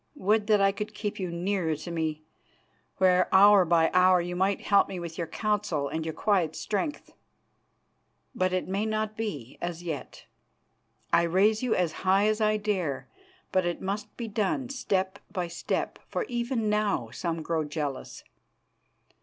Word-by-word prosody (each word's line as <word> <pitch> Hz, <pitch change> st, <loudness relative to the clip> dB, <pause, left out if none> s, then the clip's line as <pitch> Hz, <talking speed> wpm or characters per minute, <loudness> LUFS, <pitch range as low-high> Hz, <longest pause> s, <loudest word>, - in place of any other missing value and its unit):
Would 210 Hz, -4 st, +1 dB
that 210 Hz, -2 st, +4 dB
I 195 Hz, 0 st, +4 dB
could 210 Hz, +1 st, -6 dB
keep 210 Hz, -1 st, -4 dB
you 185 Hz, -2 st, -2 dB
nearer 170 Hz, -1 st, -1 dB
to 155 Hz, +4 st, -8 dB
me, 160 Hz, -2 st, -2 dB, 0.7 s
where 185 Hz, -1 st, +4 dB
hour 200 Hz, 0 st, +7 dB
by 165 Hz, -1 st, +3 dB
hour 185 Hz, 0 st, +5 dB
you 175 Hz, +1 st, -3 dB
might 190 Hz, +2 st, +1 dB
help 200 Hz, -1 st, +3 dB
me 185 Hz, -, -5 dB
with 170 Hz, -1 st, -6 dB
your 170 Hz, -1 st, -3 dB
counsel 200 Hz, -7 st, -1 dB
and 160 Hz, +2 st, -3 dB
your 160 Hz, 0 st, -4 dB
quiet 180 Hz, -7 st, +1 dB
strength. 290 Hz, +8 st, -3 dB, 1.2 s
But 185 Hz, -7 st, 0 dB
it 185 Hz, 0 st, -1 dB
may 195 Hz, +3 st, -1 dB
not 215 Hz, 0 st, -2 dB
be 180 Hz, -, -5 dB
as 175 Hz, 0 st, -4 dB
yet. 160 Hz, -5 st, -6 dB, 0.9 s
I -, -, +6 dB
raise 195 Hz, +6 st, +3 dB
you 250 Hz, -3 st, +1 dB
as 180 Hz, -3 st, +1 dB
high 195 Hz, +2 st, +3 dB
as 215 Hz, +1 st, +1 dB
I 215 Hz, 0 st, +3 dB
dare, 190 Hz, -9 st, -2 dB, 0.4 s
but 185 Hz, -, +2 dB
it 175 Hz, 0 st, -2 dB
must 205 Hz, +2 st, -4 dB
be 235 Hz, -, -4 dB
done 215 Hz, +4 st, -1 dB
step 195 Hz, -7 st, -1 dB
by 180 Hz, -4 st, -2 dB
step, 170 Hz, -, -3 dB
for -, -, -1 dB
even 240 Hz, -, -2 dB
now 210 Hz, -, 0 dB
some 165 Hz, +4 st, -3 dB
grow 160 Hz, 0 st, 0 dB
jealous. 145 Hz, -2 st, -5 dB
190 Hz, 165 wpm, -28 LUFS, 170-210 Hz, 1.2 s, hour